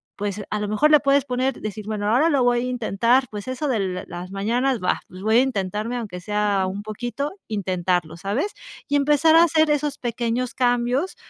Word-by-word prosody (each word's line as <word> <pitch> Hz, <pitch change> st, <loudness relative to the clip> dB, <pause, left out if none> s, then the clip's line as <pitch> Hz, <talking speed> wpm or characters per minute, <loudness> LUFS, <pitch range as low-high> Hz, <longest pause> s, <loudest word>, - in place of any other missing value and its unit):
pues, 205 Hz, 0 st, -4 dB
a 210 Hz, -, -1 dB
lo 210 Hz, -, -2 dB
mejor 215 Hz, +9 st, +2 dB
le 300 Hz, -, +8 dB
puedes 275 Hz, -1 st, +2 dB
poner 255 Hz, 0 st, -1 dB
decir: 215 Hz, 0 st, -6 dB
"Bueno, 210 Hz, -1 st, -2 dB
ahora 300 Hz, +7 st, +4 dB
lo 280 Hz, -5 st, +2 dB
voy 245 Hz, 0 st, +3 dB
a -, -, -1 dB
intentar", 240 Hz, +1 st, +2 dB
pues 205 Hz, +1 st, -7 dB
eso 260 Hz, +4 st, -3 dB
de 195 Hz, -8 st, -1 dB
las 175 Hz, +1 st, -7 dB
mañanas 235 Hz, +6 st, 0 dB
va, 180 Hz, -, 0 dB
pues, 185 Hz, +1 st, -11 dB
voy 220 Hz, +2 st, +3 dB
a -, -, +7 dB
intentarme, 215 Hz, -1 st, -2 dB
aunque 210 Hz, -7 st, -6 dB
sea 205 Hz, 0 st, 0 dB
un 200 Hz, +2 st, -6 dB
poquito, 240 Hz, +7 st, -4 dB, 0.2 s
intentarlo, 180 Hz, -5 st, -1 dB
¿sabes? 215 Hz, -, -2 dB, 0.3 s
Y 290 Hz, -, +2 dB
empezar 295 Hz, +3 st, +4 dB
a 330 Hz, -, +8 dB
hacer 315 Hz, -2 st, +3 dB
esos 295 Hz, -1 st, 0 dB
pequeños 240 Hz, +1 st, -2 dB
cambios 245 Hz, +6 st, 0 dB
235 Hz, 195 wpm, -23 LUFS, 205-265 Hz, 0.3 s, le